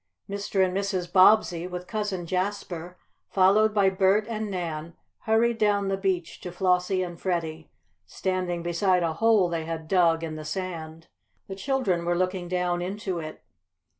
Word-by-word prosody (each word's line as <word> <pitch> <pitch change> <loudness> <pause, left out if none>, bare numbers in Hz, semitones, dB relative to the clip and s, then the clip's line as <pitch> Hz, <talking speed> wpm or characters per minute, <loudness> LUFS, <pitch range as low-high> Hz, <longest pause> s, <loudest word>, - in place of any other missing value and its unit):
Mr. 200 -1 0
and 185 0 -3
Mrs. 190 -3 -2
Bobbsey, 185 -3 +5
with 180 0 -6
Cousin 205 -4 -3
Jasper, 180 -1 -3 0.3
followed 200 +3 +4
by 200 -2 +3
Bert 195 +2 +3
and 220 -2 -3
Nan, 170 -3 -4 0.3
hurried 225 +1 +2
down 205 -2 +2
the 195 - +1
beach 190 -3 -2
to 180 - -6
Flossie 180 +1 +1
and 175 -1 -7
Freddie, 165 -3 -3 0.4
standing 180 - -2
beside 180 +1 +1
a 165 -1 0
hole 215 +1 +3
they 165 -2 -3
had 160 -1 -5
dug 165 -2 +3
in 155 -1 -4
the 155 - -7
sand. 165 -1 -5 0.4
The 195 - -6
children 195 -6 0
were 175 0 0
looking 185 0 -1
down 180 -1 -1
into 190 -1 -3
it. 155 -1 -8
185 Hz, 160 wpm, -26 LUFS, 170-195 Hz, 0.4 s, Bobbsey